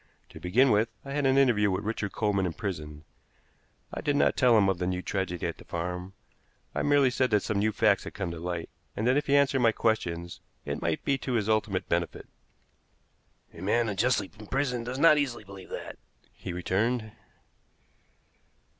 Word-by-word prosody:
To - - -11
begin 120 +9 +3
with, 110 +2 +3 0.2
I 140 - -7
had 145 -1 +1
an 130 0 +3
interview 120 -7 +4
with 95 +2 -1
Richard 105 -2 -2
Coleman 100 -3 0
in 85 - -4
prison. 75 -7 -5 0.9
I - - -4
did 145 - 0
not - - +3
tell 125 -4 +5
him 100 -2 +4
of 95 -2 0
the 90 - -1
new 90 0 -2
tragedy 95 -3 -2
at 85 - -4
the - - -11
farm; 90 +2 -4 0.6
I - - -1
merely 145 -3 +4
said 130 0 +1
that 105 -2 +2
some 105 -2 -1
new 110 +2 +2
facts 105 -2 +2
had - - -8
come 95 -4 -3
to 85 - -7
light, 85 -1 -4 0.2
and 110 - -2
that 125 +2 +4
if 145 - 0
he 140 - +3
answered 140 -1 +3
my 115 -2 +4
questions 85 -7 -1 0.2
it - - -3
might 85 -2 -1
be 135 -1 +1
to 130 - -3
his 110 -3 0
ultimate 105 -3 0
benefit. 85 -1 -2 1.3
"A 85 - -11
man 110 +4 +1
unjustly 105 0 +1
imprisoned 125 +1 -2
does 125 +1 -3
not 150 0 +6
easily 130 -6 -2
believe 100 -1 -12
that," - - -7 0.3
he - - -7
returned. 110 +6 -1
105 Hz, 190 wpm, -28 LUFS, 90-125 Hz, 1.3 s, not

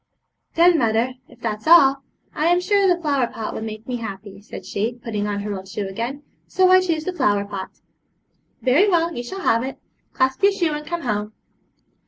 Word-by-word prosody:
'Then, 340 0 +5
mother, 230 +1 +1 0.2
if 245 - -18
that's 215 0 -4
all, 275 -5 +6 0.3
I'm 345 +3 +2
sure 395 +2 +2
the 355 -1 +2
flower 280 -6 +1
pot 225 -2 -6
would - - -5
make 220 0 -7
me 250 -1 -2
happy,' 200 -3 -8
said 210 - -10
she, 220 +4 -2
putting 220 -4 -4
on 205 -1 -2
her 205 0 -4
old 190 0 -8
shoe 195 +1 -4
again; 235 +9 -5 0.2
'so 370 0 +3
I 370 0 +7
choose 330 -4 -1
the 370 - -3
flower 205 - +1
pot.' 200 -2 -8 0.8
'Very 295 +11 +4
well, 340 -2 +1
you 240 - -3
shall 380 +11 -7
have 230 -10 +2
it. 265 +2 -5 0.4
Clasp 260 0 0
your 400 0 +5
shoe, 345 -5 0
and 300 0 -6
come 345 0 -3
home.' 210 -4 -2
255 Hz, 200 wpm, -22 LUFS, 215-340 Hz, 0.8 s, I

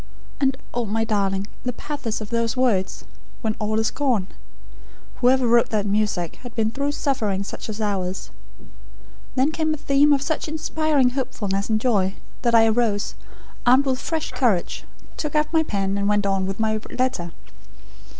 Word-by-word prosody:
'" - - -23
"And 270 -1 +2 0.2
oh, 240 -1 -1
my 220 +2 0
darling, 200 -3 0 0.2
the 250 - -2
pathos 245 -5 -4
of 215 - -7
those 230 +1 0
words, 225 -8 +1 0.4
'when 220 -2 0
all 215 +1 0
is 220 - +1
gone'! 250 -10 +1 0.9
Whoever 255 +1 +4
wrote 235 0 +4
that 210 -2 0
music, 200 -5 0
had 245 -2 -11
been 220 -1 +1
through 280 +3 -1
suffering 215 -10 0
such 200 - -7
as 215 0 -5
ours. 190 -3 -2 1.0
Then 270 +4 +3
came 315 -1 0
a - - -9
theme 285 0 +4
of 280 -1 +3
such 315 +1 -2
inspiring 310 -4 +1
hopefulness 205 -7 -2
and 215 -1 +2
joy, 200 -5 +1 0.3
that 235 -2 +3
I 225 -1 +7
arose, 220 -2 +1 0.5
armed 255 +3 +5
with 260 -1 0
fresh 320 +2 -2
courage; 215 -9 0 0.3
took 300 -1 -3
up 300 +2 +1
my 320 - +5
pen, 200 -8 -1
and 200 0 +1
went 205 -1 +2
on 195 -1 +1
with 195 +2 -4
my 215 -1 +1
letter. 250 -9 -1
230 Hz, 170 wpm, -23 LUFS, 205-270 Hz, 1.0 s, I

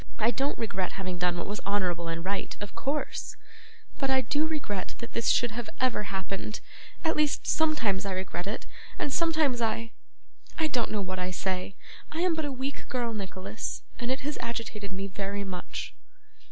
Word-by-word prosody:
'I 225 +2 +5
don't 275 +3 +1
regret 195 -5 0
having 185 -2 -2
done 175 0 +3
what 175 - -1
was 205 +1 -2
honourable 180 -4 +1
and 165 +1 -2
right, 195 +1 -1
of 205 -1 -5
course; 285 +2 -1 0.6
but 270 - +2
I 265 0 +6
do 290 +5 +2
regret 280 -12 -2
that 235 - -6
this 230 - +1
should 240 -2 +5
have 230 0 -3
ever 250 -5 +3
happened 195 +2 -2 0.5
at 320 - +4
least 300 -1 +3
sometimes 305 -12 +3
I 195 -1 -1
regret 185 0 -2
it, 210 - -2 0.3
and 285 - 0
sometimes 310 -7 +4
I 225 0 +1 0.7
I 315 -1 +3
don't 245 -5 +2
know 210 - +1
what 185 -1 -2
I 180 0 0
say; 185 +1 -1 0.4
I 320 - 0
am 360 -1 +5
but 315 -1 0
a 290 - -1
weak 265 +1 -3
girl, 240 -2 +1
Nicholas, 195 0 -3 0.2
and 240 -1 -1
it 260 - +1
has 295 +2 -2
agitated 225 -3 -3
me 190 +1 -2
very 200 +1 -2
much. 185 -2 -4
215 Hz, 185 wpm, -30 LUFS, 190-265 Hz, 0.7 s, I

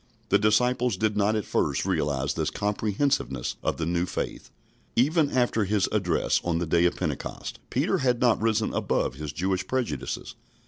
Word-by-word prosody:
The - - +4
disciples 120 +1 +2
did 110 +1 0
not 105 +1 +2
at 105 - -1
first - - 0
realise 70 -1 0
this 80 -1 -1
comprehensiveness 105 - -1
of - - -1
the 80 - -2
new 85 +2 0
faith. - - -4 0.5
Even 150 +4 +3
after 120 -5 +1
his 100 0 +1
address - - +1
on 85 -1 0
the 85 - -1
day 85 +2 +3
of 90 - +2
Pentecost, - - -4
Peter 175 +8 +1
had 125 -3 +1
not 120 -4 +3
risen 110 -1 +1
above - - 0
his 75 +2 -6
Jewish 95 +4 -1
prejudices. 130 -2 -3
105 Hz, 170 wpm, -26 LUFS, 85-125 Hz, 0.5 s, The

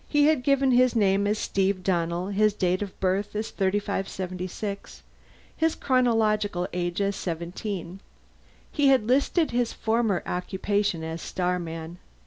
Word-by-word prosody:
He 295 -1 +3
had 305 -3 +3
given 275 0 +3
his 250 0 +4
name 200 -2 +3
as 210 +1 +1
Steve 195 -2 0
Donnell, 175 0 0
his 210 +1 +2
date 185 -2 0
of 200 -2 -6
birth 195 +3 0
as 215 +1 -3
3576, 195 0 -3 0.5
his 320 0 +1
chronological 215 -7 +1
age 175 +1 -2
as 200 0 0
seventeen. 175 +2 -5 0.7
He 290 -2 +2
had 265 -5 +4
listed 280 +7 +2
his 240 -1 0
former 220 -4 0
occupation 190 -1 -1
as 160 +1 -5
Starman. 175 -2 -3
200 Hz, 130 wpm, -26 LUFS, 180-225 Hz, 0.7 s, his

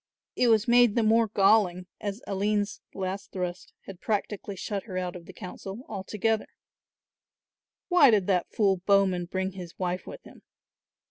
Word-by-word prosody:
It 250 - +3
was 220 -1 +4
made 240 -2 +5
the 235 - +3
more 225 +1 +4
galling 195 -3 +3
as 205 +2 -5
Aline's 205 +1 -1
last 190 0 -4
thrust 180 -2 -5
had 190 -2 -11
practically 205 -1 -2
shut 200 +1 -4
her 185 -5 -6
out 180 -1 -3
of 170 -2 -10
the - - -9
council 195 +3 -8
altogether. 210 +2 -1 1.4
Why 355 -7 +6
did 210 -5 +3
that 180 -2 +1
fool 195 -3 +2
Bowman 190 -1 +2
bring 190 +2 -2
his 180 -3 -10
wife 180 0 -3
with - - -9
him? - - -15
195 Hz, 155 wpm, -27 LUFS, 185-215 Hz, 1.4 s, Why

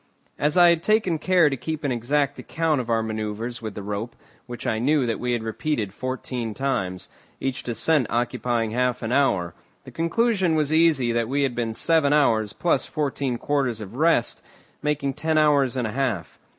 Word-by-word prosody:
As 150 +3 +1
I 175 -1 +8
had 170 -1 +2
taken 205 -5 +1
care 180 -2 +4
to 140 - 0
keep 155 +4 -5
an 140 - 0
exact 140 +4 0
account 160 -4 0
of 120 - -9
our 115 -1 +1
manoeuvres 110 +2 -4
with 110 -3 -6
the 100 - -6
rope, 105 +4 -4 0.3
which 120 -1 -8
I 110 - 0
knew 140 +2 +2
that 115 -2 -2
we 125 0 -1
had 120 -2 -2
repeated 110 -3 -2
fourteen 125 -2 -4
times, 95 -10 -2 0.3
each 135 -1 -2
descent 125 +3 +1
occupying 120 -1 -1
half 125 +1 0
an 110 - -2
hour, 100 - +1 0.3
the - - -11
conclusion 185 0 +1
was 155 -1 +1
easy 155 -7 +3
that 115 -1 0
we 140 +1 +1
had 135 -3 0
been 115 -2 -3
seven 160 -1 +2
hours, 110 -8 +3
plus 175 - 0
fourteen 140 -4 -2
quarters 135 -4 -1
of 105 -1 -8
rest, 155 -4 +1 0.4
making 150 -2 -1
ten 160 +3 -1
hours 145 -4 +3
and 125 - 0
a 110 - -3
half. 120 -9 -2
130 Hz, 190 wpm, -24 LUFS, 115-150 Hz, 0.4 s, I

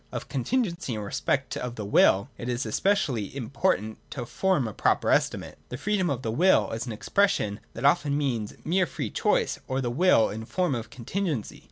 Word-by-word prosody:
Of - - -5
contingency 170 - -1
in 105 - -4
respect 125 +6 -1
of 125 -1 -4
the 105 - -5
Will 100 +1 +4
it 120 - -6
is 125 +2 -1
especially 150 - +1
im 125 +2 -7
portant 125 - 0
to 125 -3 -5
form 180 -2 +1
a 110 - -6
proper - - +2
estimate. - - 0
The 125 - -5
Freedo 205 +8 0
m 180 -2 +1
of 130 -2 -2
t 115 - -2
he - - -2
Will 185 +6 +4
is 115 +3 -4
an - - -3
expression 110 - +1
that - - -4
often 145 -1 +3
means 120 -8 -2
mere 180 +2 +2
free - - -4
choice, - - +1
or 130 0 -1
the 120 -3 -1
will 145 -4 +4
in 110 - -5
the 110 - -7
form 180 -2 0
of 115 -2 -4
contingency. 140 - -3
130 Hz, 210 wpm, -27 LUFS, 115-175 Hz, -, Will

